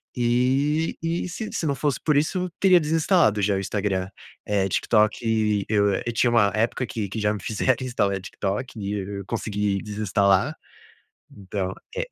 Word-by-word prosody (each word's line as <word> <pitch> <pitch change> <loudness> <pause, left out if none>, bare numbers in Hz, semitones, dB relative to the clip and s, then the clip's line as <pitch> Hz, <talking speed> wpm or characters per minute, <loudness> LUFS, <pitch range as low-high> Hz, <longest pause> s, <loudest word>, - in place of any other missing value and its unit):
e 130 +6 +1
e 170 +2 -1
se 215 +5 -5
se 165 - -2
não 140 - 0
fosse 145 +1 -1
por 150 -2 +1
isso, 180 +4 0
teria 185 -2 +6
desinstalado 155 - +2
já 100 0 +2
o - - 0
Instagram, 95 -1 -2 0.4
eh, 100 -2 0
TikTok 105 +3 +3
e 110 -3 +1
eu 100 -2 +3
eu 120 - -3
tinha 120 +1 +2
uma 110 -4 +4
época 115 +3 0
que 105 -4 -4
que 110 - -4
já 105 0 +1
me 105 - -6
fizeram 130 +4 0
instalar 100 -6 0
TikTok 105 +5 -4
e 100 0 -3 0.3
eu 100 - -8
consegui 105 -3 -1
desinstalar, 100 -2 +1 0.8
então 95 -1 -4 0.2
é. - - -2
110 Hz, 170 wpm, -24 LUFS, 100-135 Hz, 0.8 s, teria